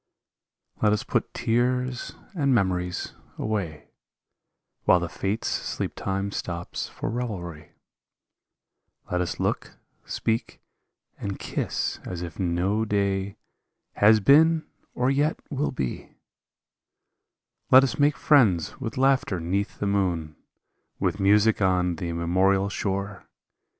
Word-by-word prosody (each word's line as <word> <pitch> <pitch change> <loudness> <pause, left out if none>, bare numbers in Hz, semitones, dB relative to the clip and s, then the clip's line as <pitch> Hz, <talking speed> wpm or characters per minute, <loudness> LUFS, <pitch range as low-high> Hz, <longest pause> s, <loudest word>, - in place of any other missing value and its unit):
Let 105 -1 +4
us 105 - -1
put - - -1
tears 125 +2 0 0.2
and 140 -7 +2
memories 90 -4 -1 0.2
away, 95 -9 -3 1.0
While 90 - +6
the 85 - -2
fates 100 +6 -2
sleep - - -2
time 100 +1 -2
stops 85 -3 -4
for - - -5
revelry; 90 -10 -5 1.4
Let 90 0 +1
us 85 -3 -3
look, - - -2 0.3
speak, 115 +1 -2 0.6
and 100 -1 -4
kiss - - -2
as 90 -1 -5
if 85 - -8
no 95 +4 +1
day 100 -2 -1 0.6
Has 110 +1 +5
been 155 +7 +5 0.3
or 125 +2 +2
yet 145 +3 +1
will 145 +1 -1
be; 65 - -5 1.5
Let 130 +1 +8
us 135 +2 -1
make 145 +1 +3
friends 105 - +3
with 115 -3 -5
laughter 130 -8 +2
'neath 95 +5 -2
the - - -2
moon, 90 -6 0 0.6
With 100 - 0
music 105 +3 +4
on 90 -2 +2
the 85 - -4
immemorial 95 +4 +2
shore. 100 0 -3
100 Hz, 115 wpm, -26 LUFS, 90-120 Hz, 1.5 s, Let